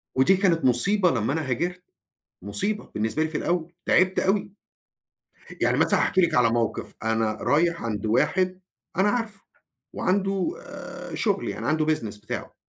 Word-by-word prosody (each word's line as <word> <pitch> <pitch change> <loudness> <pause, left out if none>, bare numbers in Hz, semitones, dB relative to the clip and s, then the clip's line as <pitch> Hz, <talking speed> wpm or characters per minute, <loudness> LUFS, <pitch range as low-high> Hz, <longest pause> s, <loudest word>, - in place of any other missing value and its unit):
ودي 180 +9 +4
كانت 170 -7 +2
مُصيبة 180 - +3
لمّا 115 +2 0
أنا 160 -5 -2
هاجرت. 180 +8 -2 0.6
مُصيبة 105 - -3
بالنسبة 110 +9 0
لي 160 - -1
في 155 - -2
الأوّل، 170 -1 -1
تعبت 185 +1 +3
أوي. 195 +1 0 1.1
يعني - - +3
مثلًا - - +3
هاحكي 190 - +2
لِك 170 - +2
على 120 -2 +5
موقف، 115 -1 -2
أنا 110 0 +1
رايح 165 +6 +1
عند 110 -2 -3
واحد 185 - +1 0.4
أنا 200 +2 +4
عارفه، 220 -3 -2 0.5
وعنده 195 - 0 0.6
شغل 200 -4 0
يعني - - -4
عنده 155 +1 +2
business 105 -5 -7
بتاعه. 110 - -6
170 Hz, 145 wpm, -25 LUFS, 120-190 Hz, 1.1 s, على